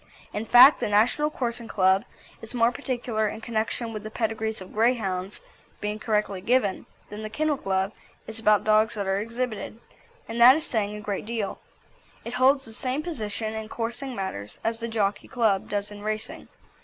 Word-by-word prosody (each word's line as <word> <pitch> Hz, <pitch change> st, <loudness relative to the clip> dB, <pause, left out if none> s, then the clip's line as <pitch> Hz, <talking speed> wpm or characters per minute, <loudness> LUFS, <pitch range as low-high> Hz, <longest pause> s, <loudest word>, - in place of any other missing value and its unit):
In 215 Hz, +2 st, -3 dB
fact, 255 Hz, +4 st, +9 dB
the -, -, -1 dB
National 235 Hz, +9 st, +3 dB
Coursing 240 Hz, -5 st, -3 dB
Club 190 Hz, -1 st, +3 dB, 0.4 s
is 225 Hz, +2 st, -8 dB
more 235 Hz, 0 st, +4 dB
particular 240 Hz, -5 st, -2 dB
in 220 Hz, -, -7 dB
connection 225 Hz, +1 st, -2 dB
with 215 Hz, -, -5 dB
the 215 Hz, -, -7 dB
pedigrees 220 Hz, -1 st, -2 dB
of 185 Hz, -1 st, -11 dB
Greyhounds 210 Hz, -5 st, 0 dB, 0.4 s
being 210 Hz, +1 st, -3 dB
correctly 210 Hz, -4 st, -1 dB
given, 210 Hz, -2 st, +1 dB, 0.2 s
than 210 Hz, +1 st, -6 dB
the 215 Hz, -, -5 dB
Kennel 300 Hz, +6 st, 0 dB
Club 190 Hz, -3 st, -1 dB, 0.3 s
is 220 Hz, 0 st, -5 dB
about 210 Hz, -2 st, +4 dB
dogs 215 Hz, +1 st, +3 dB
that 200 Hz, -2 st, -2 dB
are 195 Hz, +1 st, +1 dB
exhibited; 230 Hz, -1 st, -4 dB, 0.5 s
and 230 Hz, +1 st, -3 dB
that 250 Hz, +3 st, +10 dB
is 315 Hz, +1 st, -2 dB
saying 210 Hz, -3 st, -1 dB
a 210 Hz, -, -7 dB
great 205 Hz, 0 st, -4 dB
deal. 225 Hz, -4 st, -3 dB, 0.7 s
It 235 Hz, -, -5 dB
holds 270 Hz, +2 st, +4 dB
the 225 Hz, -, -10 dB
same 260 Hz, +6 st, -2 dB
position 220 Hz, -8 st, -3 dB
in 220 Hz, 0 st, -5 dB
coursing 240 Hz, +4 st, -4 dB
matters 105 Hz, -, -5 dB
as 225 Hz, 0 st, -1 dB
the 230 Hz, -, -3 dB
Jockey 210 Hz, -3 st, -1 dB
Club 220 Hz, -7 st, +1 dB
does 205 Hz, 0 st, -2 dB
in 205 Hz, 0 st, -9 dB
racing. 215 Hz, +2 st, -4 dB
220 Hz, 180 wpm, -26 LUFS, 210-240 Hz, 0.7 s, that